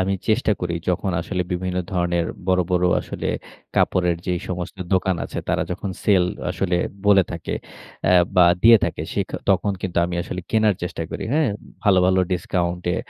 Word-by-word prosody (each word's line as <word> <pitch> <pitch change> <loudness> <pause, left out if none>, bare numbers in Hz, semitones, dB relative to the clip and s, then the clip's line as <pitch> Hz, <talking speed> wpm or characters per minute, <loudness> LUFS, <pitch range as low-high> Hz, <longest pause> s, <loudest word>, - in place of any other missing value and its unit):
আমি 95 +1 +1 0.2
চেষ্টা 110 0 +3
করি 85 -1 -2
যখন 90 +2 0
আসলে 90 +2 -2
বিভিন্ন 90 0 -2
ধরনের 85 -2 0 0.2
বড়, 95 -1 +3
বড় 90 0 +2 0.2
আসলে - - -5 0.5
কাপড়ের 90 -2 +2
যেই 90 -2 0
সমস্ত 90 0 -4 0.2
দোকান 95 0 +2
আছে - - -6
তারা - - +1
যখন 100 - -3
সেল 95 -4 +4 0.3
আসলে 90 -1 0 0.3
বলে 100 -2 +6
থাকে। 85 - -4 0.5
আ - - +4 0.3
বা 90 - +8 0.2
দিয়ে 115 +1 +9
থাকে - - -3
সে - - 0
ক - - -14 0.2
তখন 100 +2 +2
কিন্তু 90 -2 -1
আমি 90 - -4
আসলে 90 +1 -5
কেনার 110 -2 +3
চেষ্টা 90 -1 -3
করি। - - -4
হ্যাঁ? 155 -2 +3 0.4
ভালো, 100 -2 +5
ভালো 95 0 +3
ডিসকাউন্টে 90 0 -1
90 Hz, 175 wpm, -22 LUFS, 90-95 Hz, 0.5 s, দিয়ে